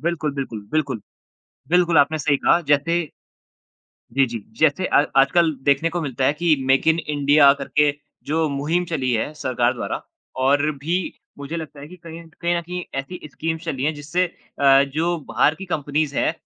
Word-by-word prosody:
बिल्कुल, 155 -3 -2
बिल्कुल, 125 -6 -5
बिल्कुल। 140 -7 -1 0.7
बिल्कुल 175 -2 +3
आपने 155 +2 +3
सही 145 -1 +2
कहा, 170 - +3
जैसे 150 +3 +1 1.1
जी, 135 0 +4
जी। 115 -4 -6 0.2
जैसे 155 +4 +2
अ, 145 - +3
आजकल 155 +4 +4
देखने 140 +4 +2
को 175 0 -3
मिलता 135 -3 -2
है 145 - +3
कि 160 0 +2
मेक 135 +3 +2
इन 160 +1 +4
इंडिया 145 -1 +4
करके 145 +1 +2 0.3
जो 160 +1 0
मुहिम 155 +6 -1
चली 135 -7 -2
है 130 +7 -1
सरकार 125 -4 0
द्वारा 120 - -4 0.4
और 145 +2 +3
भी 165 +6 -1 0.4
मुझे 140 +4 -6
लगता 155 -3 -8
है 145 - -9
कि 180 - -12
कहीं 165 0 -9
एंड 165 -1 -15
कहीं 175 0 +1
न - - -2
कहीं 180 +1 -6 0.2
एसी 175 +7 -7
स्कीम्स 160 +1 -4
चली 140 -5 -3
हैं 155 +2 +1
जिससे 150 +5 -1 0.3
अ, 135 0 +6
जो 165 +5 -1
बाहर 155 - +2
की 195 - -8
कम्पनीज़ 150 -3 -2
हैं, - - +1
150 Hz, 180 wpm, -22 LUFS, 140-165 Hz, 1.1 s, अ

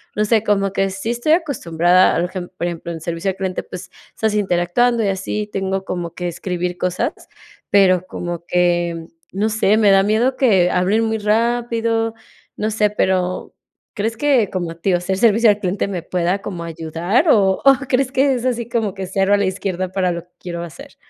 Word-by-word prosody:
no 210 - +1
sé, 220 0 +2
como 195 -2 +1
que 195 0 +1
sí 195 +4 -4
estoy 240 +6 +1
acostumbrada 180 - +2
arejem 180 +1 -3
por - - -2
ejemplo, 170 -1 -4
en 165 -1 -7
servicio 170 +3 -3
al 190 - -4
cliente, 190 -1 -2
pues 185 - -10 0.2
estás 220 -1 0
interactuando 210 +4 +1
y 200 - +1
así 195 +2 -3
tengo 190 0 -2
como 175 -3 -5
que 180 - -3
escribir 180 +1 -4
cosas, 185 - -1 0.6
pero 185 -2 +4
como 175 -2 -5
que, 175 -2 0 0.2
no 205 +3 0
sé, 215 -1 +2
me 215 -2 +4
da 195 0 +5
miedo 225 +6 +1
que 195 -9 +4
hablen 190 +6 +1
muy 220 0 -1
rápido, 230 +1 0 0.4
no 215 - -2
sé, 210 -1 +1
pero 185 -3 -1 0.4
¿crees 225 +1 -2
que 250 -5 +2
como 175 -3 -3
a - - -9
ti, 180 +3 0
o 175 - +1
ser 190 +1 -2
servicio 225 +2 +4
al 205 0 +2
cliente 195 0 -1
me 185 -4 -4
pueda 180 +2 -1
como 175 -5 -5
ayudar 170 - -1
o 195 -6 +3
o 275 - +9 0.2
crees 260 0 +1
que 270 0 +2
es 245 0 -4
así 240 -2 -1
como 225 -5 -1
que 190 -1 -6
cero 195 +1 +1
a - - +5
la 200 - +1
izquierda 185 -1 -2
para 185 -1 0
lo 170 0 -4
que 175 - -35
quiero 170 -1 -6
hacer? 170 -2 -11
195 Hz, 200 wpm, -19 LUFS, 180-220 Hz, 0.6 s, o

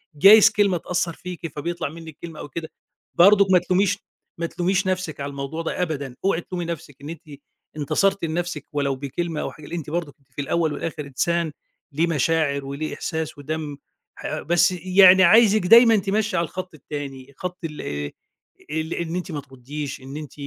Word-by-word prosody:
جايز 205 +7 +8
كلمة 200 -4 +2
تأثّر 175 0 -2
فيكِ 180 0 -7
فبيطلع 170 +1 -3
منِّك 160 -1 -11
كلمة 165 -2 -8
أو 145 - -7
كده. 160 +3 -6 0.5
برضو 200 +2 +7
ما 180 - +7
تلوميش، 190 +3 +1 0.4
ما 170 - -2
تلوميش 185 +3 0
نفسِك 185 -5 -2
على 140 0 -3
الموضوع 140 +3 -5
ده 165 - -3
أبدًا. 145 -7 -3
اوعي 195 -3 +2
تلومي 175 0 -5
نفسك 165 -4 -6
إن 145 - -8
أنتِ 165 -2 -7 0.6
انتصرتِ 195 +6 +1
لنفسِك 165 -2 -3
ولو 140 -2 0
بكلمة 150 +4 -3
أو - - -3
حاجة. 155 - -13
لأ 170 - -6
أنتِ 160 -3 -5
برضو 165 -3 -3 0.2
في - - -5
الأول 160 +2 0
والآخر 155 -3 -4
إنسان 165 +4 0 0.4
ليه 160 +4 +1
مشاعر 150 -2 +1
وليه 140 +3 -4
إحساس 160 -1 -4
ودم. 150 0 -5 0.4
ح - - -4
بس 175 +3 +3
يعني 185 +1 +6
عايزِك 215 +3 +6
دايمًا 230 +2 +8
تمَشّي 205 0 0
على 170 - +2
الخط 185 +2 -7
التاني، 140 -2 -7
خط 180 0 -5
ال 150 -2 -6
آآ، 75 0 -4 0.6
ال 160 +1 -2
إن 170 0 -3
أنتِ 180 0 -4
ما 150 -2 -4
ترُدّيش، 135 +1 -7
إن 135 +2 -8
أنتِ 150 -3 -8
165 Hz, 180 wpm, -23 LUFS, 145-180 Hz, 0.6 s, جايز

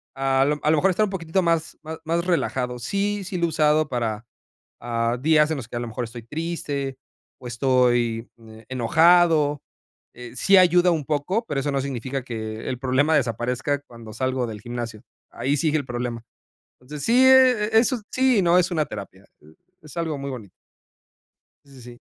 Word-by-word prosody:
a 135 0 +2
lo 150 +1 0
a 150 - +2
lo 160 - +3
mejor 190 +6 +3
estar 215 +4 +2
un - - -5
poquitito 180 0 -1
más 165 -1 0
más 160 +1 -7
más 170 +2 -1
relajado. 130 -8 -1
Sí 200 - -2
sí 185 0 -5
lo 170 - +1
he - - +1
usado 155 -1 +2
para, 115 -2 -3 0.6
ah, 115 0 -1
días 150 +1 +3
en 160 - -1
los 125 - -7
que - - -12
a - - -2
lo 120 - -5
mejor 120 +2 -4
estoy 115 0 -9
triste, 145 -1 -4 0.4
o 125 - -12
estoy, 120 -2 +1
eh, 110 -1 -15
enojado, 150 +3 +3 0.5
eh, 125 -1 -10
sí 195 +10 +4
ayuda 180 0 +5
un 155 -3 -2
poco, 155 +10 -1
pero 145 - -3
eso 145 +1 -2
no 140 - 0
significa 135 0 -4
que 110 -2 -6
el 125 - -3
problema 135 +4 +2
desaparezca 125 +2 -1
cuando 115 -5 -13
salgo 130 +1 -1
del 110 -2 -7
gimnasio. 120 -2 -6 0.3
Ahí 140 +3 -1
sigue 155 +2 +1
el 140 - -5
problema. 120 -2 -4 0.6
Entonces, 140 +3 -9
sí, 250 +3 +5
eh, 255 -5 +5
e - - +8
eso 245 +1 +1
sí, 255 -5 +3
no 175 0 +4
es 180 +1 0
una 155 -3 0
terapia, 100 -6 -9 0.2
eh, 75 - -18 0.3
es 155 0 -13
algo 160 -3 -2
muy 140 0 -5
bonito. 110 -8 -8 1.1
Sí, 140 - -20
sí, 130 -2 -14
sí. 120 0 -12
140 Hz, 195 wpm, -23 LUFS, 120-165 Hz, 1.1 s, e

